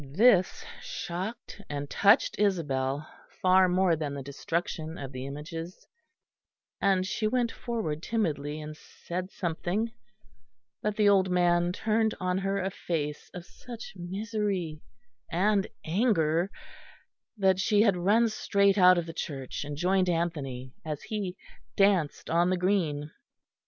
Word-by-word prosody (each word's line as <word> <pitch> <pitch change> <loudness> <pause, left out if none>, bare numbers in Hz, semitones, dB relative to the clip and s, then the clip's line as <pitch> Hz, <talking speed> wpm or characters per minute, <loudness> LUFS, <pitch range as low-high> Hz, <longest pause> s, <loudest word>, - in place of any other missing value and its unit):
This 205 -3 +4 0.2
shocked 210 - -5
and 145 -1 -3
touched 205 - +4
Isabel 145 -7 0 0.3
far 185 0 +5
more 180 -1 +3
than 150 -2 -3
the 140 - -5
destruction 160 +3 -3
of 135 -2 -6
the 130 0 -6
images; 165 +5 -7 1.0
and 190 -2 +3
she 215 +3 -1
went 240 0 +1
forward 215 -11 -3
timidly 155 -9 -1
and 155 0 -7
said 180 +3 -6
something; 185 +5 -2 0.9
but 210 -1 -1
the 210 -1 +3
old 195 -2 +4
man 175 -1 +3
turned 220 +3 +1
on 185 0 0
her 195 +1 -1
a 190 0 -2
face 150 -5 -3
of 175 -1 -7
such 235 +3 -10
misery 190 -3 -3 0.5
and 200 +3 +2 0.2
anger 170 -3 +2 0.9
that 190 -2 +3
she 205 +2 +4
had 200 -4 +4
run 205 +7 +3
straight 200 -2 +2
out 180 0 +7
of 170 - 0
the 165 - -7
church, 135 -6 -5
and 145 0 -6
joined 185 +2 +2
Anthony 140 -7 -2
as 155 -3 -5
he 200 -4 -4 0.4
danced 195 -7 +2
on 170 +2 +3
the 185 - +1
green. 165 -6 0
180 Hz, 135 wpm, -28 LUFS, 155-200 Hz, 1.0 s, out